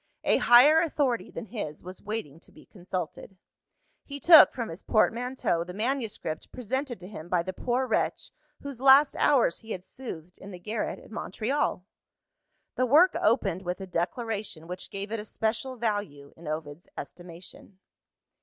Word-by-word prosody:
A -, -, +3 dB
higher 285 Hz, +7 st, +7 dB
authority 285 Hz, -7 st, 0 dB
than -, -, -7 dB
his 205 Hz, -9 st, -6 dB
was 185 Hz, +1 st, -9 dB
waiting 205 Hz, -8 st, -5 dB
to -, -, -19 dB
be -, -, -17 dB
consulted. 185 Hz, 0 st, -6 dB, 0.7 s
He 285 Hz, 0 st, -7 dB
took 325 Hz, +1 st, +9 dB
from 235 Hz, -3 st, -4 dB
his 165 Hz, +4 st, -8 dB
portmanteau 235 Hz, -5 st, +1 dB
the 180 Hz, +1 st, -9 dB
manuscript 225 Hz, -, -3 dB
presented 255 Hz, 0 st, -3 dB
to 180 Hz, -, -9 dB
him 175 Hz, -4 st, -9 dB
by 175 Hz, -2 st, +1 dB
the 185 Hz, +1 st, -5 dB
poor 250 Hz, +6 st, -1 dB
wretch, 240 Hz, -, -1 dB, 0.3 s
whose 275 Hz, -3 st, -7 dB
last 275 Hz, +2 st, +6 dB
hours 255 Hz, -12 st, +3 dB
he 225 Hz, 0 st, -7 dB
had 180 Hz, -, -7 dB
soothed 180 Hz, -8 st, -9 dB
in 195 Hz, -, -10 dB
the 185 Hz, -, -8 dB
garret 215 Hz, +5 st, -3 dB
at -, -, -16 dB
Montreal. 225 Hz, -1 st, -2 dB, 0.9 s
The 255 Hz, -, 0 dB
work 320 Hz, +9 st, +5 dB
opened 215 Hz, -6 st, +1 dB
with 180 Hz, 0 st, -4 dB
a 190 Hz, -, -6 dB
declaration 190 Hz, 0 st, -3 dB
which 180 Hz, +2 st, -7 dB
gave 200 Hz, +1 st, -6 dB
it 225 Hz, -, -2 dB
a -, -, -5 dB
special 225 Hz, +4 st, -2 dB
value, 205 Hz, -, -3 dB
in 165 Hz, -1 st, -12 dB
Ovid's 155 Hz, +1 st, -6 dB
estimation. 175 Hz, +2 st, -10 dB
215 Hz, 165 wpm, -27 LUFS, 180-250 Hz, 0.9 s, took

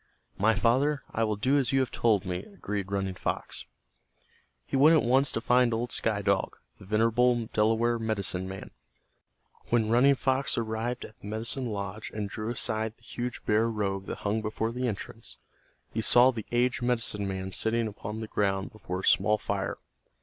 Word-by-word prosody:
"My 110 Hz, +3 st, +4 dB
father, 130 Hz, +7 st, +2 dB
I 115 Hz, -, +1 dB
will 110 Hz, -1 st, +1 dB
do 130 Hz, +7 st, +2 dB
as 135 Hz, -, +1 dB
you 135 Hz, -, +3 dB
have 130 Hz, -, -2 dB
told 110 Hz, -5 st, +2 dB
me," 90 Hz, -1 st, -2 dB
agreed 105 Hz, -, -5 dB
Running 95 Hz, -1 st, -1 dB
Fox. -, -, -4 dB, 1.0 s
He -, -, -3 dB
went 150 Hz, +5 st, +7 dB
at 150 Hz, -, +2 dB
once 135 Hz, +3 st, +4 dB
to -, -, -1 dB
find 125 Hz, -1 st, +3 dB
old 120 Hz, +2 st, -2 dB
Sky 105 Hz, -2 st, 0 dB
Dog, 100 Hz, -1 st, 0 dB, 0.2 s
the 100 Hz, -, -12 dB
venerable 115 Hz, +3 st, +3 dB
Delaware 115 Hz, +2 st, +2 dB
medicine 100 Hz, -4 st, -1 dB
man. 95 Hz, 0 st, -8 dB, 1.0 s
When 115 Hz, -2 st, +2 dB
Running 130 Hz, +4 st, +5 dB
Fox 130 Hz, +1 st, 0 dB
arrived 115 Hz, +2 st, -2 dB
at 110 Hz, -, -14 dB
the -, -, -10 dB
medicine 115 Hz, +5 st, -2 dB
lodge 100 Hz, 0 st, -4 dB
and 105 Hz, -2 st, -2 dB
drew 110 Hz, +2 st, -5 dB
aside 110 Hz, -2 st, -2 dB
the 120 Hz, -, -28 dB
huge 120 Hz, +1 st, -5 dB
bear 110 Hz, +2 st, +3 dB
robe 100 Hz, -3 st, -2 dB
that -, -, -4 dB
hung 105 Hz, +2 st, +1 dB
before 110 Hz, +1 st, -2 dB
the 125 Hz, +1 st, -2 dB
entrance, 105 Hz, -4 st, -5 dB, 0.6 s
he 110 Hz, -, 0 dB
saw 120 Hz, +3 st, +6 dB
the 115 Hz, -4 st, -6 dB
aged 125 Hz, +2 st, +1 dB
medicine 115 Hz, -4 st, 0 dB
man 95 Hz, 0 st, -4 dB
sitting 115 Hz, +4 st, 0 dB
upon 105 Hz, +1 st, -6 dB
the 110 Hz, -, -5 dB
ground 95 Hz, -2 st, 0 dB
before 95 Hz, -4 st, -5 dB
a -, -, -15 dB
small 105 Hz, 0 st, +4 dB
fire. -, -, -3 dB
110 Hz, 180 wpm, -28 LUFS, 105-120 Hz, 1.0 s, went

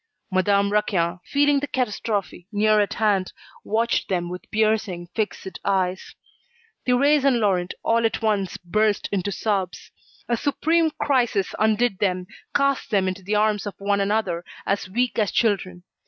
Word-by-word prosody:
Madame 200 Hz, +2 st, +2 dB
Raquin, 180 Hz, -5 st, 0 dB
feeling 285 Hz, 0 st, +3 dB
the 290 Hz, -, -3 dB
catastrophe 210 Hz, -7 st, -2 dB
near 215 Hz, 0 st, +3 dB
at 205 Hz, -, 0 dB
hand, 205 Hz, -4 st, +1 dB, 0.3 s
watched 230 Hz, +2 st, 0 dB
them 175 Hz, -2 st, -1 dB
with 180 Hz, 0 st, -8 dB
piercing, 215 Hz, -5 st, 0 dB
fixed 210 Hz, -3 st, -3 dB
eyes. 190 Hz, -1 st, -1 dB, 0.7 s
Thérèse 280 Hz, +3 st, +4 dB
and 275 Hz, -3 st, +4 dB
Laurent, 185 Hz, -4 st, 0 dB
all 230 Hz, 0 st, +2 dB
at 225 Hz, -, +1 dB
once, 210 Hz, -4 st, 0 dB
burst 210 Hz, +4 st, 0 dB
into 200 Hz, 0 st, -1 dB
sobs. 195 Hz, -2 st, -2 dB, 0.4 s
A 240 Hz, -, +1 dB
supreme 320 Hz, +6 st, +1 dB
crisis 240 Hz, -8 st, +1 dB
undid 220 Hz, -1 st, +2 dB
them, 185 Hz, -3 st, 0 dB, 0.3 s
cast 275 Hz, -1 st, +1 dB
them 195 Hz, -3 st, +2 dB
into 185 Hz, +1 st, -3 dB
the 200 Hz, +3 st, -2 dB
arms 210 Hz, 0 st, +1 dB
of 205 Hz, -, -6 dB
one 200 Hz, 0 st, 0 dB
another, 195 Hz, -4 st, 0 dB, 0.2 s
as 200 Hz, -1 st, -1 dB
weak 245 Hz, +4 st, 0 dB
as 210 Hz, -3 st, +1 dB
children. 190 Hz, -5 st, 0 dB
205 Hz, 150 wpm, -23 LUFS, 190-225 Hz, 0.7 s, Thérèse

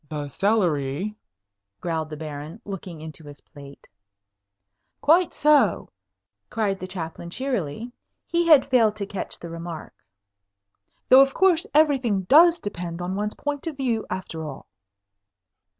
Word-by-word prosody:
"The 145 Hz, -2 st, -5 dB
celery," 180 Hz, -2 st, 0 dB, 0.7 s
growled 160 Hz, -2 st, -3 dB
the 155 Hz, -, -7 dB
Baron, 155 Hz, +4 st, -7 dB
looking 185 Hz, -5 st, -7 dB
into 160 Hz, 0 st, -9 dB
his 145 Hz, 0 st, -12 dB
plate. 140 Hz, -1 st, -14 dB, 1.1 s
"Quite 335 Hz, +4 st, +4 dB
so," 290 Hz, -, +3 dB, 0.6 s
cried 205 Hz, -3 st, -1 dB
the 185 Hz, -, -6 dB
Chaplain, 170 Hz, -2 st, -6 dB
cheerily. 235 Hz, -, -3 dB, 0.3 s
He 340 Hz, 0 st, 0 dB
had 300 Hz, -6 st, +6 dB
failed 225 Hz, -4 st, +4 dB
to 205 Hz, -2 st, -4 dB
catch 200 Hz, -1 st, -5 dB
the 170 Hz, -, -9 dB
remark. 165 Hz, -1 st, -7 dB, 1.2 s
"Though 260 Hz, +1 st, +9 dB
of 270 Hz, 0 st, +2 dB
course 380 Hz, 0 st, +3 dB
everything 265 Hz, -10 st, +3 dB
does 330 Hz, -, +6 dB
depend 175 Hz, -4 st, -6 dB
on 180 Hz, +1 st, -3 dB
one's 210 Hz, +1 st, -3 dB
point 290 Hz, +2 st, -4 dB
of 310 Hz, -4 st, -5 dB
view, 240 Hz, -5 st, -1 dB
after 180 Hz, -3 st, -5 dB
all." 150 Hz, -3 st, -8 dB
195 Hz, 135 wpm, -24 LUFS, 160-265 Hz, 1.2 s, Though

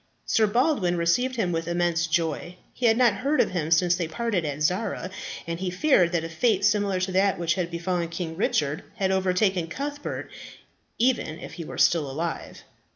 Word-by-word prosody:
Sir 220 Hz, -1 st, +3 dB
Baldwin 225 Hz, -, +1 dB
received 245 Hz, +10 st, +1 dB
him 200 Hz, -7 st, 0 dB
with 165 Hz, -1 st, -2 dB
immense 170 Hz, -1 st, +1 dB
joy. 165 Hz, +1 st, -1 dB, 0.2 s
He 245 Hz, -, +1 dB
had 225 Hz, 0 st, +4 dB
not 245 Hz, -4 st, +5 dB
heard 280 Hz, +7 st, 0 dB
of -, -, +3 dB
him 165 Hz, -4 st, -2 dB
since 175 Hz, +2 st, +4 dB
they 175 Hz, -2 st, -2 dB
parted 205 Hz, 0 st, -1 dB
at 145 Hz, 0 st, -3 dB
Zara, 185 Hz, +2 st, -1 dB, 0.3 s
and 165 Hz, 0 st, -4 dB
he 185 Hz, 0 st, -2 dB
feared 180 Hz, -, +3 dB
that 170 Hz, -2 st, +1 dB
a -, -, -3 dB
fate 200 Hz, +3 st, +1 dB
similar 205 Hz, -3 st, +2 dB
to 185 Hz, +1 st, -1 dB
that 190 Hz, +1 st, +2 dB
which 170 Hz, -2 st, +1 dB
had 175 Hz, -1 st, -2 dB
befallen 170 Hz, 0 st, -2 dB
King 170 Hz, -1 st, -5 dB
Richard 150 Hz, -5 st, 0 dB
had 190 Hz, -1 st, 0 dB
overtaken 190 Hz, -1 st, +1 dB
Cuthbert, 290 Hz, -, -5 dB, 0.7 s
even 235 Hz, -10 st, +1 dB
if 175 Hz, -, -9 dB
he 170 Hz, -, -6 dB
were -, -, -8 dB
still 155 Hz, -5 st, +3 dB
alive. 160 Hz, +5 st, -5 dB
180 Hz, 190 wpm, -25 LUFS, 170-210 Hz, 0.7 s, not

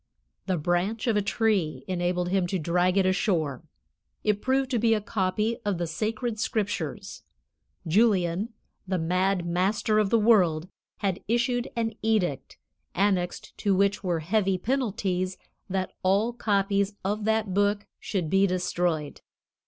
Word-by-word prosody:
The 185 Hz, -2 st, +1 dB
branch 175 Hz, -, 0 dB
of 230 Hz, -3 st, +2 dB
a 210 Hz, -, +3 dB
tree 200 Hz, -6 st, 0 dB
enabled 180 Hz, -1 st, -1 dB
him 185 Hz, -1 st, +1 dB
to 190 Hz, -, -1 dB
drag 180 Hz, +3 st, +1 dB
it 195 Hz, -, +4 dB
ashore; 170 Hz, -, 0 dB, 0.6 s
it 210 Hz, -1 st, +1 dB
proved 265 Hz, 0 st, +1 dB
to 240 Hz, -, +1 dB
be 225 Hz, 0 st, +3 dB
a -, -, 0 dB
copy 210 Hz, +2 st, -1 dB
of 205 Hz, -3 st, 0 dB
the 175 Hz, -, -1 dB
sacred 215 Hz, +6 st, -2 dB
Scriptures; 210 Hz, -2 st, -3 dB, 0.6 s
Julian, 190 Hz, +1 st, +2 dB, 0.4 s
the 185 Hz, 0 st, 0 dB
mad 180 Hz, +2 st, +1 dB
master 205 Hz, +5 st, +1 dB
of 210 Hz, -2 st, +2 dB
the 230 Hz, -, +4 dB
world, 185 Hz, -8 st, +3 dB, 0.3 s
had 195 Hz, -2 st, 0 dB
issued 240 Hz, +2 st, +1 dB
an 225 Hz, -1 st, -1 dB
edict, 210 Hz, -10 st, 0 dB, 0.4 s
annexed 190 Hz, -2 st, 0 dB
to 200 Hz, -3 st, +2 dB
which 200 Hz, +2 st, +1 dB
were 175 Hz, -3 st, 0 dB
heavy 195 Hz, +2 st, +1 dB
penalties, 190 Hz, -5 st, -1 dB, 0.3 s
that 190 Hz, -1 st, -2 dB
all 200 Hz, +5 st, +2 dB
copies 200 Hz, -2 st, +1 dB
of 205 Hz, +2 st, -1 dB
that 220 Hz, -3 st, +1 dB
book 205 Hz, +1 st, +1 dB
should 185 Hz, -6 st, -2 dB
be 195 Hz, +4 st, +3 dB
destroyed. 175 Hz, -4 st, -1 dB
195 Hz, 145 wpm, -27 LUFS, 180-215 Hz, 0.6 s, it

